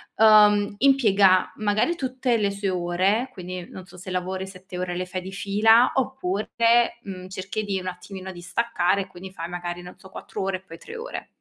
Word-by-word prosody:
uhm, 210 -2 +6
impiega 205 -9 +4
magari 215 +10 +1
tutte 255 -5 0
le 205 -2 +1
sue 200 0 -2
ore, 185 +7 +1
quindi 180 -1 -7
non 185 - -10
so 185 - -16
se 180 +1 -9
lavori 185 +1 -3
7 185 -1 -9
ore 180 -1 -3
le 180 +1 -2
fai 185 0 -5
di 190 +1 -8
fila, 220 +5 +4
oppure, 235 -1 +1
mhmm, 185 -2 -8
cerchi 190 +3 -4
di 200 -2 -2
un 185 - -7
attimino 185 +1 -7
di 175 - -10
staccare, 200 -1 0
e 190 - -6
quindi 185 +1 -10
fai 170 -3 -6
magari 175 0 -5
non 180 - -12
so, 190 - -14
4 - - -7
ore 190 -1 -1
e - - -19
poi 165 -3 -12
3 460 - -10
ore. - - -6
190 Hz, 200 wpm, -24 LUFS, 185-215 Hz, -, uhm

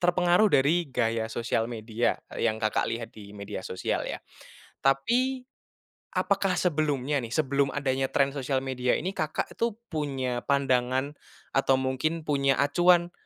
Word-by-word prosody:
terpengaruh 180 +3 +4
dari 155 +5 +3
gaya 115 -2 0
sosial 115 0 -1
media 115 0 -1 0.2
yang 110 -1 +1
Kakak 110 -1 +1
lihat 115 0 -4
di 100 -1 -11
media 100 0 -6
sosial 95 - -2
ya. - - -4 0.6
Tapi, 245 - +1 0.7
apakah 195 -2 +1
sebelumnya 150 -5 +1
nih, 115 - -5
sebelum 140 -2 +2
adanya 135 -2 0
tren 140 0 +2
sosial 135 -1 0
media 125 -1 0
ini, 185 - -3
Kakak 155 0 -2
tuh 230 -2 0 0.2
punya 135 -5 -2
pandangan, 130 0 +1 0.4
atau 135 0 +4
mungkin 130 +5 -1
punya 140 -2 +2
acuan, 175 +4 +4
140 Hz, 135 wpm, -27 LUFS, 125-160 Hz, 0.7 s, terpengaruh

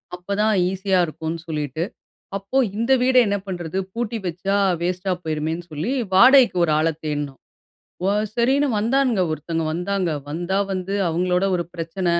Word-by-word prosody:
அப்ப 180 +3 -4
தான் 215 0 +3 0.2
ஈஸியா 190 0 +1
இருக்கும்னு 160 +1 -5
சொல்லிட்டு. 150 -1 -3 0.5
அப்போ 200 +7 -3 0.2
இந்த 230 +4 0
வீட 255 +1 +2
என்ன 205 0 +1
பண்றது? 175 -2 -4 0.2
பூட்டி 235 -1 -2
வச்சா 180 +4 -1 0.3
வேஸ்ட்டா 180 +2 -1
போயிருமேன்னு 160 +2 -2
சொல்லி, 155 - -2 0.2
வாடகைக்கு 250 +1 +7
ஒரு 165 - +2
ஆள 155 +1 +2 0.2
தேடுனோம், 145 -3 -3 0.7
வ - - +2 0.3
சரின்னு 270 +4 +2
வந்தானுங்க. 235 -1 +2
ஒருத்தங்க 160 +1 -3
வந்தாங்க. 180 +1 -1 0.2
வந்தா, 175 +5 -1
வந்து 190 +1 -3
அவங்களோட 180 +2 +1
ஒரு 175 - -2
பிரச்சன, 170 +2 -4
180 Hz, 145 wpm, -22 LUFS, 165-205 Hz, 0.7 s, வாடகைக்கு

